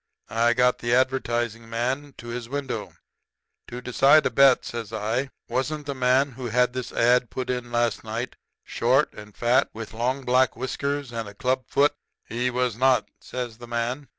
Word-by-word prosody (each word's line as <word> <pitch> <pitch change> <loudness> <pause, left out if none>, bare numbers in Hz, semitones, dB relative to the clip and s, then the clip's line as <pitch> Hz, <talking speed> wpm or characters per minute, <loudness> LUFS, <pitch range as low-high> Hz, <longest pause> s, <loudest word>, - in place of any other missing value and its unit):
I 115 +1 +3
got 125 0 +3
the 120 0 +1
advertising 120 -3 0
man 130 +5 -2
to 120 - -9
his 120 0 -5
window. 140 -1 -4 0.7
"'To 125 +1 -7
decide 135 +5 +5
a - - +1
bet,' 135 -2 +5
says 115 -2 -5
I, 115 +5 -1 0.2
'wasn't 150 +3 -2
the 140 - -3
man 130 +2 +2
who 125 +1 -8
had 125 +2 +2
this 130 -1 -4
ad. 120 0 +3
put 125 -1 -3
in 125 -1 -4
last 120 0 0
night 115 +3 -4 0.3
short 130 +5 +2
and 105 -1 -12
fat, 120 +2 +3
with 110 -1 -7
long 125 +4 -1
black 125 0 +3
whiskers 140 +2 -3
and 115 -3 -4
a 100 - -14
club 130 +3 0
foot?' 145 +1 +3 0.3
"'He 120 +2 -1
was 125 -2 0
not,' 125 -2 +3
says 120 -3 -6
the 120 - -10
man. 120 +4 -2
125 Hz, 180 wpm, -25 LUFS, 120-130 Hz, 0.7 s, decide